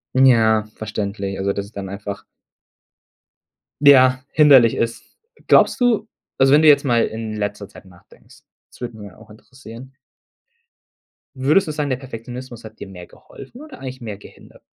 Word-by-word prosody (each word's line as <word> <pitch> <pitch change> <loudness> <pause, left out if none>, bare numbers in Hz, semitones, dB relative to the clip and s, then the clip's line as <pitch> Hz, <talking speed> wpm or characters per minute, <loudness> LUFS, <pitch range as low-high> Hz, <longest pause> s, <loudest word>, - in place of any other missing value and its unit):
Ja, 115 -5 +4
verständlich. 100 -2 -5
Also, 100 +1 -1
dass 100 - -5
es 100 - -16
dann 100 -3 -7
einfach 100 0 -7 1.6
ja, 130 -3 +5
hinderlich 140 -7 +5
ist. 115 0 -3 0.4
Glaubst - - +4
du 235 -3 +1 0.3
also 135 0 +4
wenn 150 +2 +5
du - - +5
jetzt 145 -2 +6
mal 120 -4 +1
in 110 -1 -6
letzter 105 -1 -5
Zeit 100 - -16
nachdenkst, 90 -2 -21 0.3
das - - -21
würde 120 -2 -7
mich 105 -1 -10
ja 95 - -17
auch 110 0 -18
interessieren 130 +3 -14 1.4
Würdest 150 +9 +2
du - - -3
sagen, 150 -1 -3
der 130 - -1
Perfektionismus 125 -1 -10
hat 110 0 -13
dir - - -8
mehr 90 -2 -12
geholfen 245 - -15
oder 305 -4 -13
eigentlich 130 -1 -8
mehr 110 -4 -7
gehindert? - - -17
115 Hz, 165 wpm, -19 LUFS, 105-135 Hz, 1.6 s, jetzt